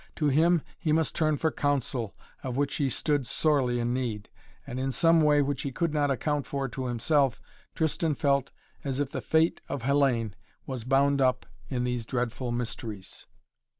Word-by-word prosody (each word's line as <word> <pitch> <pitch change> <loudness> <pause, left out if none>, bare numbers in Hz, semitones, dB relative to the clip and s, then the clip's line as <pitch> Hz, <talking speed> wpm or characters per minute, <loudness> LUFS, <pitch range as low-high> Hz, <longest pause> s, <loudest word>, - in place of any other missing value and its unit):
To 150 -2 +1
him 165 +3 +4 0.2
he 155 - 0
must 160 0 +2
turn 155 -2 +1
for 160 +3 +1
counsel, 135 -6 -1 0.3
of 125 -1 -4
which 145 0 0
he 140 -2 +1
stood 145 0 0
sorely 130 -4 +2
in 120 +1 0
need. 115 -5 -3 0.4
And 125 - -5
in 135 +1 0
some 165 +3 +4
way 150 -1 +5
which 140 -1 -2
he 140 - -3
could 165 +4 -1
not 145 -2 +2
account 145 +2 -1
for 140 -1 -2
to 130 +1 -4
himself, 130 +2 +2 0.4
Tristan 160 -1 0
felt 140 -2 +1 0.3
as 135 -1 -2
if 140 -2 -1
the - - -3
fate 160 +1 +2
of 140 -4 -3
Hellayne 130 -6 +2 0.3
was 130 -4 -5
bound 140 +1 +3
up 130 -1 +2 0.2
in 125 -3 -1
these 125 -2 -2
dreadful 125 0 -2
mysteries. 110 -4 -4
135 Hz, 180 wpm, -28 LUFS, 125-150 Hz, 0.4 s, way